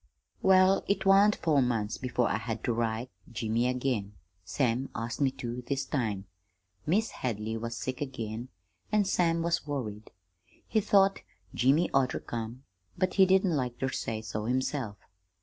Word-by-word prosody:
"Well, 190 0 +5
it 200 - 0
wan't 200 +2 +6
four 150 -4 +2
months 115 -4 -1
before 125 -1 0
I - - 0
had 110 0 -4
ter - - +1
write 115 +1 -2 0.2
Jimmy 115 +1 0
again. 125 -5 -1 0.3
Sam 125 - 0
asked 115 +4 -4
me 140 - +4
too, 125 -1 -5
this 140 -1 -1
time. 105 -8 -2 0.6
Mis' 210 +8 +2
Hadley 110 -2 -3
was 115 +1 -4
sick 130 +1 -4
again, 120 -3 -4 0.4
an' 210 -1 +3
Sam 170 -3 +2
was 170 -2 0
worried. 110 -7 -4 0.6
He 220 - +2
thought 195 -1 +4 0.3
Jimmy 140 +8 +3
ought 135 -2 +4
ter - - -3
come 120 - -5
home, 115 +4 -8 0.3
but 185 0 +1
he 190 -2 +6
didn't 190 -2 +3
like 125 -3 -2
ter 130 - -1
say 110 -3 -3
so 110 -1 -4
himself. 125 -3 -1
125 Hz, 165 wpm, -29 LUFS, 115-165 Hz, 0.6 s, wan't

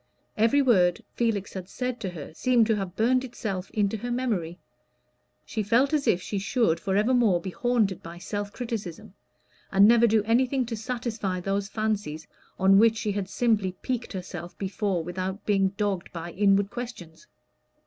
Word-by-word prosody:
Every 230 +6 +3
word 180 -9 +3
Felix 220 -4 -1
had 185 -1 -7
said 250 +1 -3
to 200 -5 -3
her 160 -3 -8
seemed 240 +5 +3
to 220 0 +2
have 195 -3 -4
burned 250 +4 +2
itself 200 -7 -5
into 210 0 0
her 245 +4 -5
memory. 215 -10 -2 0.9
She 220 - -3
felt 235 +8 +2
as 295 -2 +1
if 180 - +2
she 200 - -3
should 195 -4 +1
forevermore 210 0 +2
be 185 +2 -6
haunted 225 -5 0
by 170 +1 -9
self 205 +3 -4
criticism, 215 -4 -6 0.6
and 195 +1 +6
never 235 +1 +6
do 220 -1 +3
anything 250 +4 +2
to 230 0 -4
satisfy 220 -5 -3
those 195 +2 -1
fancies 210 -8 -2 0.3
on 195 +1 +5
which 225 0 +5
she 215 -1 -1
had 200 -2 -3
simply 210 -5 +1
piqued 245 -3 -3
herself 175 -2 -7
before 195 -2 -1
without 185 +3 -4
being 195 -2 +3
dogged 200 -4 -1
by 170 0 -6
inward 200 +1 +2
questions. 235 -10 -8
205 Hz, 165 wpm, -26 LUFS, 185-235 Hz, 0.9 s, and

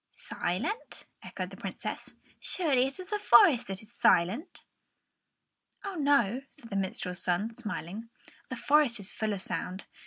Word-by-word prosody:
"Silent?" 195 - -3 0.2
echoed - - -6
the - - -10
Princess. - - -6 0.2
"Surely, 275 -8 +2
it 270 - -6
is 370 +1 -8
the 420 - 0
forest 300 - +6
that 195 +1 -5
is 215 +2 -11
silent!" 210 - +2 1.2
"Oh, 395 - -3
no," 280 - +3
said 230 - -13
the - - -3
minstrel's 185 -1 -2
son, 200 +6 -1
smiling; 210 -1 -6 0.4
"the 255 - -3
forest 275 -2 +3
is 200 0 -6
full 220 -1 -2
of 195 -2 -3
sound. 185 +2 -4
230 Hz, 150 wpm, -30 LUFS, 195-285 Hz, 1.2 s, forest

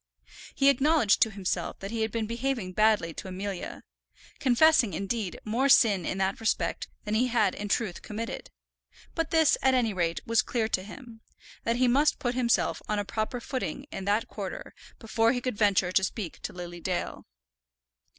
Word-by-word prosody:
He 275 - +5
acknowledged 280 -5 +3
to 225 - +5
himself 195 -3 -3
that 195 +1 -7
he 230 -1 -2
had 220 0 0
been 230 -1 -1
behaving 235 -3 -2
badly 215 -5 +2
to - - -8
Amelia, 190 0 -5 0.6
confessing, 260 - +4
indeed, 200 +1 -3
more 240 +6 +1
sin 205 -9 +5
in - - -2
that 190 +1 0
respect 225 - -1 0.2
than 210 - -2
he 240 +4 +3
had 220 -6 +2
in 205 0 -5
truth 205 -5 -1
committed; 225 +2 -6 0.6
but 330 -1 -1
this, 320 -2 +4
at 265 0 +4
any 230 -4 +1
rate, 170 -3 0
was 230 -1 +3
clear 230 -3 -1
to 185 - 0
him, 225 +3 -11 0.4
that 230 - +1
he 250 +1 +3
must 285 +5 +3
put 245 -1 -2
himself 240 -2 +1
on 210 - 0
a 205 - -1
proper 220 +4 -3
footing 265 +2 -4
in 190 - -5
that 205 +3 +1
quarter - - -7 0.2
before 225 +1 +1
he 250 - -1
could 250 -2 -2
venture 195 -4 +3
to 190 - +3
speak 190 -2 -4
to - - -5
Lily 175 -1 -8
Dale. 180 0 -3
220 Hz, 180 wpm, -28 LUFS, 195-245 Hz, 0.6 s, He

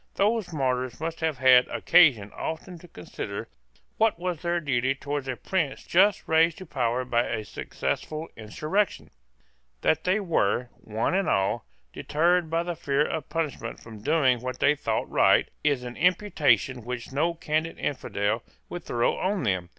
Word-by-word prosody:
Those 210 -1 +1
martyrs 130 -4 -1
must 165 +1 -4
have 160 -4 -1
had 125 -1 +6
occasion 125 - +4
often 165 +2 -5
to 175 - -14
consider 90 - -7 0.5
what 220 -3 +3
was 175 -2 -3
their 175 0 0
duty 130 -3 0
towards 140 0 -4
a 130 - -2
prince 165 -2 -2
just 195 +3 +3
raised 160 +1 +3
to 185 - -9
power 125 -4 -1
by 120 -1 +1
a 110 -2 -3
successful 155 +9 -4
insurrection. 155 - -2 0.7
That 160 0 +2
they 185 +4 +2
were, 125 - 0
one 110 +7 -1
and 195 +1 +1
all, 95 0 +1 0.3
deterred 170 +2 +1
by 165 +1 0
the 175 0 -4
fear 145 -2 +1
of 160 - -4
punishment 150 -8 -3
from 110 -2 -12
doing 130 -2 +3
what 130 0 -4
they 140 - +4
thought 150 - -2
right, - - +4 0.2
is 145 -4 +1
an 120 0 -7
imputation 145 - +2
which 125 +1 -6
no 165 +5 0
candid 160 0 -2
infidel 110 -5 -1 0.3
would 175 -1 -6
throw 120 0 0
on 190 -2 0
them. 95 -6 -1
150 Hz, 160 wpm, -26 LUFS, 125-170 Hz, 0.7 s, had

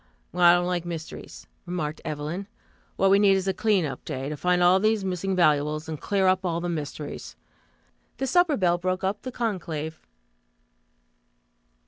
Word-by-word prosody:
"Well, 180 0 -1
I 175 0 +9
don't 175 0 +2
like 180 -1 -1
mysteries," 165 -2 -8 0.2
remarked 160 -4 -3
Evelyn. 155 +6 -4 0.5
"What 195 0 +3
we 200 - +6
need 200 -1 +5
is 190 0 -3
a 190 - +2
clean 210 -3 +2
up 140 - -6
day, 135 +2 -4
to 150 - -3
find 180 +3 +1
all 180 +2 +6
these 215 -1 +1
missing 190 +1 -1
valuables, 150 -2 +2
and 155 -2 -6
clear 195 -2 +1
up 185 +1 +3
all 170 -2 -1
the 175 +1 -3
mysteries." 150 -2 -5 0.8
The 270 - -1
supper 350 +1 +3
bell 175 -2 +2
broke 185 +1 -2
up 195 +2 -1
the 255 - -6
conclave. 170 -10 -3
180 Hz, 170 wpm, -26 LUFS, 160-195 Hz, 0.8 s, I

